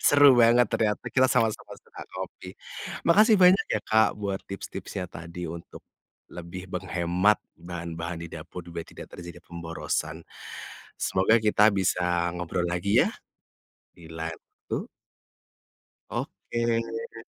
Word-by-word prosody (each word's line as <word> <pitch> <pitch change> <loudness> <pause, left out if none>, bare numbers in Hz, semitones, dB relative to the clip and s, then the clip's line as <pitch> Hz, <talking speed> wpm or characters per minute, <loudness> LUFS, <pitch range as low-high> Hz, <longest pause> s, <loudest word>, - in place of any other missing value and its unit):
Seru 145 -1 +8
banget 120 +1 +6
ternyata 105 -2 +1
kita 130 0 +4
sama-sama 115 -3 +1
suka - - -12
kopi, - - -7 0.6
makasih 215 +5 +6
banyak 185 0 +6
ya 105 - 0
Kak 110 -1 +3
buat 100 -2 -3
tips-tipsnya 100 -1 -5
tadi 85 +1 -7
untuk, 85 +1 -8 0.5
lebih 90 +1 -7
menghemat 90 +2 +2 0.2
bahan-bahan 85 -1 -5
di - - -7
dapur 90 - -8
biar 85 -1 -6
tidak - - -11
terjadi 85 0 -9
pemborosan. 80 -1 -4 0.7
Semoga 95 +4 +3
kita 105 0 +5
bisa 90 -2 +1
ngobrol 90 0 -2
lagi 90 +3 +3
ya, - - -1 0.8
di 85 -2 -14
lain 80 0 -4
waktu. - - -6 1.2
Oke. 115 - -3
90 Hz, 115 wpm, -27 LUFS, 85-110 Hz, 1.2 s, Seru